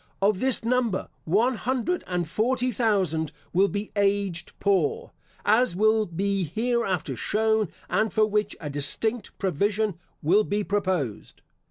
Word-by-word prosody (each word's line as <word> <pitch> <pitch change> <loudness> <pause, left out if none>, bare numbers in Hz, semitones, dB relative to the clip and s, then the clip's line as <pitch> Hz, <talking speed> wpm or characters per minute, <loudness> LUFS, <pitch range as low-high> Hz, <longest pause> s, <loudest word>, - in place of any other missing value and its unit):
Of 195 -1 +2
this 260 0 +1
number, 235 -5 0 0.2
one 225 +9 +2
hundred 260 - -1
and 180 -2 -1
forty 250 +7 0
thousand 190 - +1 0.2
will 190 +3 +4
be 205 +1 -4
aged 200 -4 0
poor, 430 - +1 0.3
as 220 -1 +3
will 215 +2 +3
be 195 +3 -1
hereafter 195 - -1
shown, 220 - +1 0.2
and 215 +3 +1
for 215 +3 +3
which 210 -1 0
a 155 - -6
distinct 195 - -2
provision 200 +2 0 0.2
will 190 +8 +4
be 205 0 -1
proposed. 185 - -2
205 Hz, 135 wpm, -26 LUFS, 185-220 Hz, 0.3 s, will